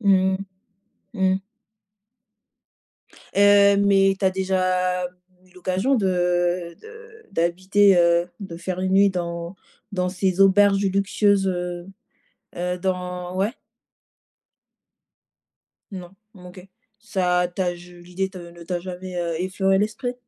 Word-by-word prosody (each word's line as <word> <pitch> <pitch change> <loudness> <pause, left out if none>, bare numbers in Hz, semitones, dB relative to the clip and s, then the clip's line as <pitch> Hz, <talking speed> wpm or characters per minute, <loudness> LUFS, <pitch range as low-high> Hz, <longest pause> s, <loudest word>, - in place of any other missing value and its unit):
Mmh 190 -2 +3
mh. - - 0 1.0
Mmh. 190 - -3 2.0
Heu, 200 0 +6
mais 195 -1 +3
tu - - -3
as 190 - +4
déjà 185 -1 0 0.4
eu 185 - -25
l'occasion 185 +8 0
de 175 -4 0
de 450 0 -15
d'habiter, 185 +3 +3
heu, 170 0 +3
de 175 -4 -7
faire 180 +1 -4
1 185 0 -1
nuit 200 +1 +5
dans 170 -1 -5 0.4
dans 180 -2 -1
ces 185 0 -1
auberges 195 +1 +5
luxueuses, 200 +1 +1
heu 175 -1 -4 0.7
heu, 180 +1 -2
dans 180 -1 -3
ouais? 200 +5 0 2.4
Non, 180 -3 -8 0.2
OK. 180 0 -12 0.4
Ça 180 -4 0
t'a 180 -2 -1
je 175 0 -14
l'idée 180 +2 -4
te 190 -1 -11
ne 170 -1 -12
t'a 175 +1 -3
jamais, 185 0 -7
heu, 170 -1 -2
effleuré 190 +1 +1
l'esprit? 220 +5 -2
185 Hz, 120 wpm, -23 LUFS, 180-195 Hz, 2.4 s, Heu